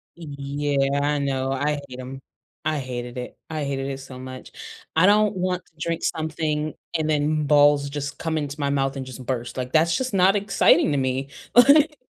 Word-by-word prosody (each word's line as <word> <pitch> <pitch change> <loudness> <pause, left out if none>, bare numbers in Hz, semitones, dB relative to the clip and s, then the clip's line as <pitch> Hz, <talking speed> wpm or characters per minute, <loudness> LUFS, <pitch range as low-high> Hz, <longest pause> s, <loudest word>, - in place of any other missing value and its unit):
Yeah, 140 -2 -1
I 145 +1 +1
know, 135 -1 -1
no, - - -1
I 145 +2 -1
hate 125 0 -9
‘em. 130 +1 -7 0.5
I 155 -1 0
hated 125 -1 -6
it, 125 - -6
I 155 -2 -3
hated 135 -1 -2
it 135 -1 -4
so 130 -1 -10
much. 130 0 -9 0.4
I 165 +3 +5
don't 210 0 +4
want 180 -1 -2
to - - -29
drink 165 +1 -2
something 155 -1 -2 0.2
and 155 -1 -1
then 150 0 +1
balls 145 -1 +4
just 140 -1 -5
come 160 -1 -2
into 145 -2 -4
my 140 -1 0
mouth 135 -1 0
and 135 -1 -5
just 130 0 -9
burst, 120 -1 -3
like, 125 0 -4
that's 165 +2 +3
just 255 -3 -3
not 190 +1 +4
exciting 200 -5 +3
to 145 - +1
me, 135 +1 -1 0.3
like 290 +4 +6
145 Hz, 200 wpm, -23 LUFS, 135-160 Hz, 0.5 s, like